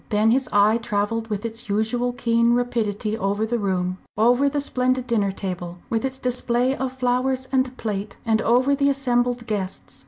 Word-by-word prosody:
Then 215 +1 +3
his 260 +2 +1
eye 210 +3 +4
travelled 225 0 -1
with 210 0 -3
its 230 0 -6
usual 225 +4 0
keen 235 -1 +2
rapidity 220 -3 -1
over 205 0 -1
the 235 +1 -1
room, 185 -2 -1 0.2
over 245 +6 +4
the 290 +1 -1
splendid 255 -2 0
dinner 215 -5 +1
table, 180 -3 -5
with 225 +1 0
its 265 0 -2
display 250 0 0
of 265 0 -3
flowers 260 +1 0
and 260 -1 0
plate, 205 -2 -4
and 220 -1 +2
over 255 +4 +3
the 280 0 +2
assembled 245 -3 0
guests. 190 - -4
235 Hz, 175 wpm, -23 LUFS, 210-250 Hz, 0.2 s, eye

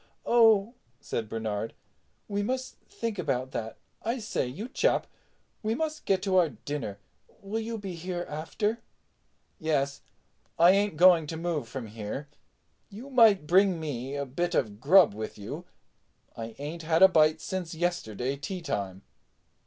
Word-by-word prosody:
"Oh," 225 -2 +5 0.3
said 110 -2 -4
Bernard, 110 -1 -3 0.5
"we 205 0 -1
must 255 +5 -3
think 225 -4 -4
about 130 -5 -1
that. 110 -3 -5 0.2
I 230 +3 -1
say, 215 - -2
you 190 - -6
chap, 260 - +1 0.6
we 220 +1 0
must 310 +2 -3
get 190 -1 +1
to 190 -2 +2
our 175 -3 +5
dinner. 140 -10 -5 0.5
Will 205 +3 -2
you 225 0 -4
be 195 -3 -6
here 175 +1 -4
after?" 205 +9 -2 0.8
"Yes. 140 -3 0 0.6
I 170 +2 +7
ain't 200 -3 +1
going 175 -2 +6
to 160 - -4
move 165 -7 -2
from 130 -1 -5
here. 110 +6 -6 0.6
You 235 +8 -10
might 225 - +6
bring 185 +1 +4
me 140 -3 -4
a 140 0 -2
bit 175 +7 -2
of 105 -5 0
grub 165 - +6
with 110 +1 -6
you—I 115 +2 -11
ain't 150 +4 -5
had 165 +2 +3
a - - +12
bite 155 -3 +4
since 180 -2 -4
yesterday 140 - -2
teatime." 140 - -4
165 Hz, 145 wpm, -28 LUFS, 135-200 Hz, 0.8 s, a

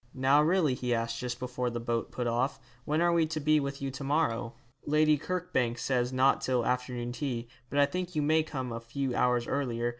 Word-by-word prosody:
'Now 135 +3 +4
really,' 160 -3 +3
he 125 -1 -1
asked, 115 0 -2
just 125 -1 -3
before 125 -1 -2
the 120 0 -4
boat 115 0 -2
put 125 - -3
off, 120 +4 0 0.3
'when 155 +2 +1
are 175 0 +3
we 165 -2 +3
to 155 0 -3
be 155 +1 +3
with 140 -1 -4
you 135 - -2
to 135 +2 -7
morrow?' 120 -6 0 0.3
'Lady 155 +1 +4
Kirkbank 150 -8 -1
says 125 -1 0
not 130 +1 +3
till 125 -3 0
afternoon 125 -1 -2
tea, 125 -3 -3 0.2
but 140 - -3
I 145 - +6
think 180 +3 -4
you 150 - +1
may 160 +2 +4
come 130 -5 -4
a 115 - -4
few 125 +3 -3
hours 125 -1 +2
earlier. 120 -4 -1
130 Hz, 215 wpm, -30 LUFS, 120-150 Hz, 0.3 s, I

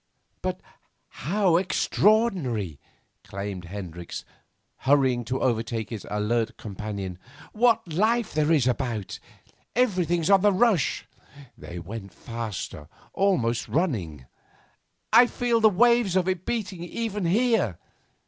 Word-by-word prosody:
'But - - -3 0.7
how 190 -3 +3
extraordinary!' 180 - +1 0.4
exclaimed 100 -2 -6
Hendricks, 85 -2 -7 0.5
hurrying 130 -3 +2
to 130 +3 -2
overtake 115 -2 -1
his 110 -4 -6
alert 110 +2 -1
companion; 100 -3 -6 0.3
'what 225 -7 +2
life 220 +5 +1
there 155 +1 +2
is 150 -6 +4
about! 120 -5 -2 0.6
Everything's 180 -8 +1
on 195 -1 +6
the 205 +1 +5
rush.' 195 - +2 0.5
They 85 - -9
went 100 +3 -8
faster, 110 -10 -6 0.3
almost 120 -13 +1
running. 95 - -1 0.9
'I 240 +2 +8
feel 235 -1 0
the 220 - +7
waves 235 -1 +3
of 185 -1 +2
it 185 -1 -2
beating 200 -7 -3
even 210 +1 -3
here. 210 - +2
150 Hz, 110 wpm, -26 LUFS, -, 0.9 s, I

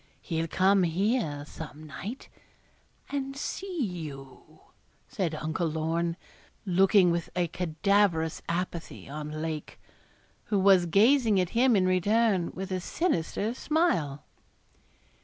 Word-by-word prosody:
He'll 165 -1 -2
come 190 +3 +3
here 175 - 0
some 155 0 -9
night 185 - -7 0.8
and 275 -1 -3
see 360 +2 -3
you,' 155 - -8 0.5
said 185 -10 -2
Uncle 155 +3 -2
Lorne, 165 +2 -1 0.5
looking 190 0 +4
with 170 -1 -2
a 175 -1 +1
cadaverous 170 0 +1
apathy 170 -1 -4
on 150 +2 -5
Lake, 160 -2 -5 0.7
who 205 - 0
was 190 -2 +5
gazing 220 - +4
at 180 -2 0
him 245 0 +4
in 190 -2 +3
return, 190 0 +2
with 190 +1 -5
a 185 - 0
sinister 215 - -1
smile. 180 - 0
180 Hz, 115 wpm, -28 LUFS, 160-210 Hz, 0.8 s, was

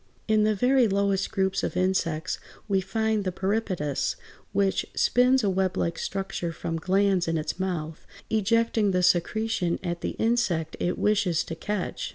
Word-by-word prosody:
In 215 -1 +3
the 215 0 +2
very 250 +3 +4
lowest 200 -1 +1
groups 190 -3 0
of - - -3
insects 180 -3 0 0.3
we 195 -2 +2
find 220 +2 0
the 185 - -1
Peripatus 180 -9 -1
(Fig. - - -26 0.3
163), 200 - +3 0.3
which - - -4
spins 250 +1 +4
a - - +2
weblike 185 -3 0
structure 190 -3 -3
from 165 0 -4
glands 190 0 +2
in 165 0 0
its 155 +3 -3
mouth, 165 -4 -4 0.2
ejecting 220 -1 +2
the 180 0 +1
secretion 180 0 +1
at 175 -1 -3
the - - -3
insect 210 -9 0
it 175 - -1
wishes 200 -6 +2
to - - -6
catch. 190 +4 -3
190 Hz, 165 wpm, -26 LUFS, 175-215 Hz, 0.3 s, very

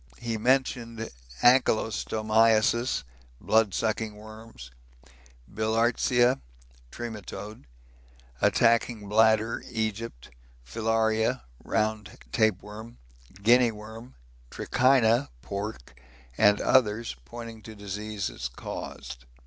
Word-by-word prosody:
He 115 -1 -3
mentioned 115 -1 0 0.3
ankylostomiasis, 110 - +3 0.4
blood 110 -3 +2
sucking 110 -1 -1
worms, 110 - -12 0.8
Bilhartsia 115 - +2 0.5
(Trematode) 110 -4 -7 0.8
attacking 115 -2 +2
bladder 110 +1 +3
(Egypt), 110 - -4 0.3
Filaria 110 - 0 0.2
(round 105 -1 -2
tapeworm), 110 +1 -1 0.5
Guinea 120 +2 +5
worm, 110 +3 -11 0.3
Trichina 125 - +2
(pork), 100 - -6 0.3
and 105 -1 +4
others, 115 - +2
pointing 115 - -9
to 110 +1 -11
disease 100 -8 -5
caused. - - -7
110 Hz, 75 wpm, -27 LUFS, 105-115 Hz, 0.8 s, Guinea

